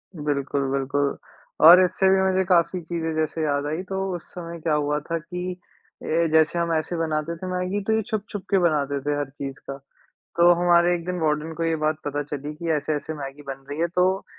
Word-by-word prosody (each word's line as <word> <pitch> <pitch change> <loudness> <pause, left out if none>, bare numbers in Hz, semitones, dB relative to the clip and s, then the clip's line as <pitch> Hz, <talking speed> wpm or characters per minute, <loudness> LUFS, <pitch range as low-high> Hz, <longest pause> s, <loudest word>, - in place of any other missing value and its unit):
बिल्कुल, 140 -2 -1
बिल्कुल। 140 +1 0 0.5
और 180 +3 +10
इससे 190 +1 +2
भी 190 0 +4
मुझे 190 0 +2
काफ़ी 180 0 +2
चीजें 165 -1 -3
जैसे 160 0 -1
याद 145 -1 0
आई 160 +5 -3
तो 190 0 -2 0.2
उस 175 - -7
समय 170 -1 -7
क्या 155 -1 0
हुआ 150 0 +1
था 165 +3 -3
कि 180 +3 -5 0.5
ये 165 +1 +1
जैसे 160 +2 +3
हम 170 -1 0
ऐसे 160 +2 -1
बनाते 160 0 -1
थे 185 - -6
मैगी, 180 +3 -1
तो 220 - 0
ये 220 - +2
छुप-छुप 205 -2 -4
के 200 - +3
बनाते 145 -5 +1
थे 145 +1 -1
हर 145 -2 -3
चीज़ 135 0 -7
का। 135 - -5 0.6
तो 170 +1 +6
हमारे 175 0 +4
एक 170 - -4
दिन 180 0 -2
वार्डन 155 0 0
को 165 +1 -2
ये 165 -1 +1
बात 155 0 0
पता 145 0 -2
चली 145 +1 -6
कि 165 +2 -4
ऐसे-ऐसे 150 +1 -2
मैगी 140 -1 -7
बन 135 0 -7
रही 145 +2 -4
है। 170 - +3
तो 185 +2 +1
160 Hz, 215 wpm, -24 LUFS, 145-175 Hz, 0.6 s, और